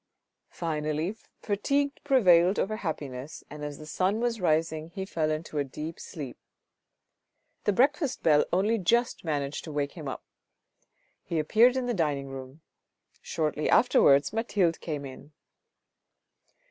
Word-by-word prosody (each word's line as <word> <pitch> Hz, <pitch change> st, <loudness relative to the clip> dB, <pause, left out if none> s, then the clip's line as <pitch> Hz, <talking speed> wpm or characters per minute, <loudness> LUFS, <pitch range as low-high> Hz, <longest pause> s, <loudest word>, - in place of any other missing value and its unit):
Finally 155 Hz, +3 st, -2 dB, 0.3 s
fatigue 280 Hz, +8 st, +1 dB
prevailed 190 Hz, -, +5 dB
over 215 Hz, +2 st, -1 dB
happiness, 145 Hz, -6 st, -5 dB
and 150 Hz, 0 st, -8 dB
as 145 Hz, -1 st, -5 dB
the 155 Hz, -, -10 dB
sun 185 Hz, +7 st, 0 dB
was 235 Hz, -3 st, -1 dB
rising 160 Hz, -1 st, +1 dB
he 190 Hz, +3 st, -5 dB
fell 160 Hz, -5 st, -1 dB
into 155 Hz, -1 st, -3 dB
a -, -, +2 dB
deep 150 Hz, +4 st, -7 dB
sleep. 140 Hz, -6 st, -8 dB, 1.3 s
The 205 Hz, -, +3 dB
breakfast 280 Hz, -, +1 dB
bell 150 Hz, -2 st, +5 dB
only 210 Hz, +6 st, +2 dB
just 235 Hz, +6 st, +1 dB
managed 145 Hz, -3 st, -2 dB
to 160 Hz, -, -7 dB
wake 145 Hz, -1 st, -1 dB
him 155 Hz, -5 st, -8 dB
up. 135 Hz, -, -5 dB, 1.0 s
He 165 Hz, -, -4 dB
appeared 225 Hz, +11 st, +4 dB
in 255 Hz, -, -1 dB
the 245 Hz, -, 0 dB
dining 145 Hz, -7 st, -1 dB
room. 135 Hz, +3 st, -9 dB, 0.6 s
Shortly 155 Hz, -1 st, -1 dB
afterwards 140 Hz, +4 st, +5 dB
Mathilde 200 Hz, -7 st, +1 dB
came 150 Hz, -4 st, -4 dB
in. 140 Hz, +3 st, -11 dB
160 Hz, 135 wpm, -28 LUFS, 150-205 Hz, 1.3 s, prevailed